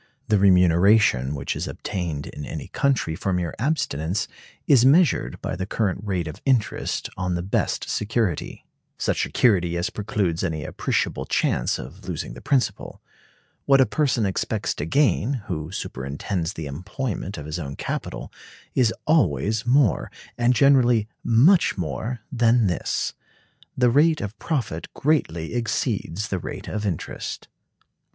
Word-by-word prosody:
The 105 -2 +4
remuneration 90 - +4
which 70 - -3
is - - -3
obtained 85 -7 -4
in 75 - -8
any - - -6
country 135 -12 0
for 95 - -2
mere 90 -3 -1
abstinence 100 - -1 0.4
is 130 -5 +5
measured 135 - +4
by - - -2
the 95 +1 -4
current 100 -3 -1
rate 95 -5 -2
of 75 - -8
interest 125 -6 0
on 90 -1 -1
the 85 - -2
best 95 - -1
security; 105 -5 -2 0.3
such - - 0
security 90 -8 +2
as 85 - -1
precludes 100 -5 -1
any 80 -5 -2
appreciable - - -1
chance - - +1
of - - -9
losing - - -4
the - - -10
principal. 130 -5 -1 0.7
What 135 0 +5
a 130 - +6
person 125 -2 +1
expects 95 - -1
to 75 - -4
gain, 130 - +2
who 80 -6 -4
superintends 80 +3 -3
the 80 - -6
employment 95 - -4
of 75 - -7
his 75 +3 -4
own 70 -4 -5
capital, - - -5 0.4
is 120 -4 +3
always 110 - +2
more, 130 -3 +3 0.3
and 120 +1 +2
generally 125 -5 +4 0.2
much 145 - +4
more, 95 - -3
than 120 -2 +3
this. 90 -3 -1 0.6
The 125 -1 +4
rate 155 +4 +4
of 100 +1 -6
profit 115 - -3
greatly 85 - 0
exceeds 110 -4 -2
the 95 - -1
rate - - -7
of 105 0 -2
interest. 90 -6 -4
100 Hz, 145 wpm, -24 LUFS, 85-125 Hz, 0.7 s, a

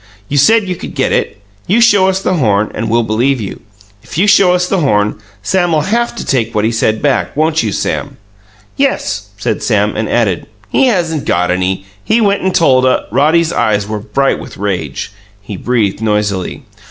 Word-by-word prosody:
"You 145 - -1
said 210 +8 +4
you 180 - -2
could - - -9
get - - 0
it. 100 - -1 0.3
You 210 +6 +3
show 205 -5 +5
us 190 0 +1
the - - +1
horn 110 - +1
and 115 - -3
we'll 120 +1 +2
believe 120 +5 0
you. 100 -4 -6 0.4
If 130 - -9
you 185 - +3
show 195 -3 +5
us 180 0 +1
the 195 - 0
horn, 105 -8 +1 0.2
Sam'll 175 - +1
haf 235 +8 -1
to - - -6
take 115 -4 -1
what 105 0 +1
he 115 - +1
said 110 -1 0
back; 145 0 0
won't 155 +1 +2
you, 110 - -2
Sam?" - - -3 0.6
"Yes," 275 0 -1
said - - -2
Sam, - - +1
and - - -2
added. - - 0 0.2
"He 265 - +3
hasn't 165 - 0
got 90 +1 +1
any. 95 +1 -1 0.2
He 220 +2 +2
went 205 -2 +2
and 190 -1 -1
told 130 -6 +4
a 130 - +2
" - - -26
Roddy's 165 +3 +2
eyes 105 -2 0
were 105 0 -3
bright 125 +6 0
with - - -10
rage; 90 -9 -3 0.3
he 100 0 -8
breathed 110 -2 -1
noisily. 105 -3 -1
130 Hz, 200 wpm, -14 LUFS, -, 0.6 s, show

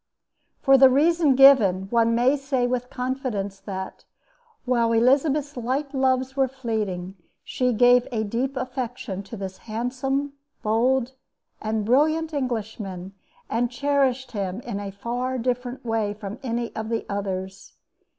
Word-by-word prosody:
For 270 -1 +6
the 265 0 +8
reason 305 +1 +3
given, 245 -9 +6
one 230 -1 +3
may 250 +4 +3
say 270 -3 -1
with 250 0 -2
confidence 250 -7 -3
that, 190 -1 -7 0.6
while 235 -2 +2
Elizabeth's 280 +5 +2
light 265 +4 -2
loves 260 0 +1
were 270 -1 +2
fleeting, 210 -8 -4 0.3
she 250 -1 0
gave 245 +1 +5
a 220 -2 -1
deep 250 +6 -2
affection 250 -5 -4
to 205 +3 -9
this 190 -1 -6
handsome, 265 +5 -2 0.3
bold, 240 +4 +2 0.5
and 215 -1 -1
brilliant 310 +6 +2
Englishman 215 -8 -4 0.3
and 240 +1 0
cherished 265 -1 0
him 195 -2 -3
in 220 -5 -5
a 200 -1 -5
far 245 +5 -3
different 250 +1 -3
way 220 -3 -1
from 210 +1 -7
any 235 -2 -3
of 220 0 -4
the 230 -1 -2
others. 190 -1 -5
245 Hz, 135 wpm, -24 LUFS, 215-265 Hz, 0.6 s, the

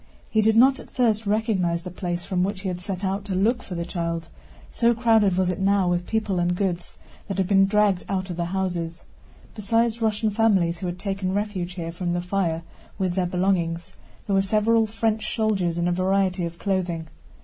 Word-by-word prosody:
He 220 - +3
did 220 +1 +3
not 265 +3 +6
at - - -11
first 225 -4 +1
recognize 195 -6 +1
the 180 - -7
place 175 -1 -4
from 180 -2 0
which 195 0 -2
he 190 - -2
had 180 -1 -4
set 195 0 -3
out 195 +1 -1
to 195 -2 -3
look 230 +6 +2
for 185 - -7
the 170 0 -3
child, 170 -2 -3 0.4
so 235 0 +2
crowded 220 -5 +3
was 185 -1 +2
it 180 - -5
now 195 -1 +2
with 175 0 0
people 215 -4 0
and 175 0 +1
goods 180 -2 -2 0.3
that 195 - -4
had 190 -2 +1
been 195 0 +5
dragged 205 -2 +2
out 190 -1 -2
of - - -4
the 170 0 -2
houses. 175 -2 -3 0.5
Besides 230 +2 0
Russian 220 0 +1
families 195 -6 +2
who 185 - -3
had 175 0 -4
taken 195 -1 -2
refuge 200 -4 -2
here 170 -2 -5
from 175 0 -3
the 175 - -1
fire 175 -3 -1 0.3
with 185 -3 0
their 180 -1 0
belongings, 175 -2 0 0.3
there 200 - -1
were 195 - +4
several 220 +3 +2
French 220 0 -1
soldiers 195 -7 0
in 170 0 +1
a - - +2
variety 185 0 +1
of 170 0 -6
clothing. 175 -4 -2
190 Hz, 205 wpm, -24 LUFS, 175-210 Hz, 0.5 s, not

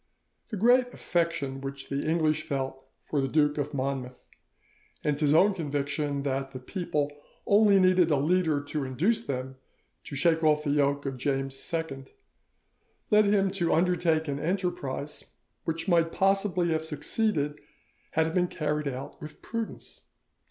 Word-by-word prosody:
The 215 - -5
great 245 +4 +4
affection 165 -6 -1
which 135 0 -7
the 140 0 -1
English 155 -1 +1
felt 135 -3 -4 0.2
for 145 - 0
the 135 - 0
Duke 150 +1 +2
of 145 - -2
Monmouth, 130 -2 -3 0.8
and 145 -1 0
his 150 -2 +3
own 190 +7 +5
conviction 145 -3 -2
that 135 -1 -1
the 130 - -6
people 150 -1 -2 0.3
only 205 -1 +5
needed 185 -2 +4
a 150 - +4
leader 155 0 +2
to 145 0 -3
induce 175 - +1
them 130 - -4 0.5
to - - -7
shake 160 +3 +2
off 150 -1 +3
the 145 - 0
yoke 140 0 +1
of 135 -1 -3
James 135 0 -2
II, 160 -5 -3 1.1
led 210 0 +6
him 200 -1 +3
to 175 -4 +1
undertake 165 -2 +2
an 140 -1 -2
enterprise 160 -5 -3 0.4
which 165 +2 -2
might 165 -2 +3
possibly 195 -3 +1
have 160 -1 0
succeeded 150 0 -1 0.5
had 160 0 +3
it 160 - -3
been 180 0 +2
carried 150 -3 -2
out 135 0 -6
with 150 0 -10
prudence. 230 -1 -6
150 Hz, 150 wpm, -28 LUFS, 140-180 Hz, 1.1 s, led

